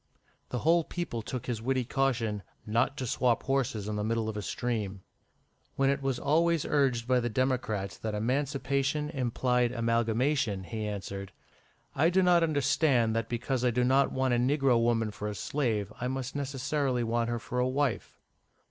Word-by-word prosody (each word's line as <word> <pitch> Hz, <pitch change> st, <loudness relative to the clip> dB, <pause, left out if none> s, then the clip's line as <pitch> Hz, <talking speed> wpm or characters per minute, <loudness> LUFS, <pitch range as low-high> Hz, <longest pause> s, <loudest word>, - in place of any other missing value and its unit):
The 125 Hz, -, -2 dB
whole 165 Hz, +6 st, +3 dB
people 170 Hz, -9 st, -4 dB
took 125 Hz, +2 st, -5 dB
his 120 Hz, -3 st, -3 dB
witty 130 Hz, +1 st, 0 dB
caution 115 Hz, -5 st, 0 dB, 0.2 s
"not 115 Hz, +6 st, +1 dB
to 130 Hz, -, -3 dB
swap 120 Hz, 0 st, +1 dB
horses 125 Hz, -6 st, -1 dB
in 105 Hz, -1 st, -2 dB
the 105 Hz, -, -1 dB
middle 110 Hz, 0 st, 0 dB
of 110 Hz, -, -5 dB
a 105 Hz, -, -3 dB
stream." 105 Hz, -3 st, -3 dB, 0.7 s
When 135 Hz, 0 st, +3 dB
it 140 Hz, -, -1 dB
was 135 Hz, -2 st, -1 dB
always 165 Hz, +3 st, +2 dB
urged 130 Hz, -5 st, +1 dB
by 125 Hz, -1 st, +3 dB
the 120 Hz, 0 st, -1 dB
Democrats 110 Hz, -6 st, -1 dB
that 110 Hz, -1 st, -3 dB
emancipation 140 Hz, +4 st, 0 dB
implied 125 Hz, -3 st, +1 dB
amalgamation, 115 Hz, -1 st, +1 dB
he 110 Hz, +1 st, -4 dB
answered 100 Hz, -1 st, -5 dB, 0.6 s
"I 155 Hz, +5 st, +3 dB
do 185 Hz, +1 st, +3 dB
not 175 Hz, -1 st, +5 dB
understand 140 Hz, -6 st, +2 dB
that 115 Hz, -1 st, -1 dB
because 125 Hz, +1 st, -1 dB
I 125 Hz, -, +4 dB
do 125 Hz, +1 st, +1 dB
not 135 Hz, +2 st, +3 dB
want 130 Hz, -1 st, +1 dB
a -, -, +3 dB
negro 130 Hz, -1 st, +3 dB
woman 115 Hz, -2 st, +1 dB
for 105 Hz, 0 st, -5 dB
a 105 Hz, -, -4 dB
slave, 110 Hz, -6 st, -1 dB
I 125 Hz, -, 0 dB
must 130 Hz, 0 st, -4 dB
necessarily 135 Hz, -2 st, -1 dB
want 115 Hz, 0 st, 0 dB
her 120 Hz, -, -1 dB
for 125 Hz, +2 st, -4 dB
a 125 Hz, +1 st, +2 dB
wife." 135 Hz, -2 st, -1 dB
125 Hz, 175 wpm, -29 LUFS, 115-135 Hz, 0.7 s, not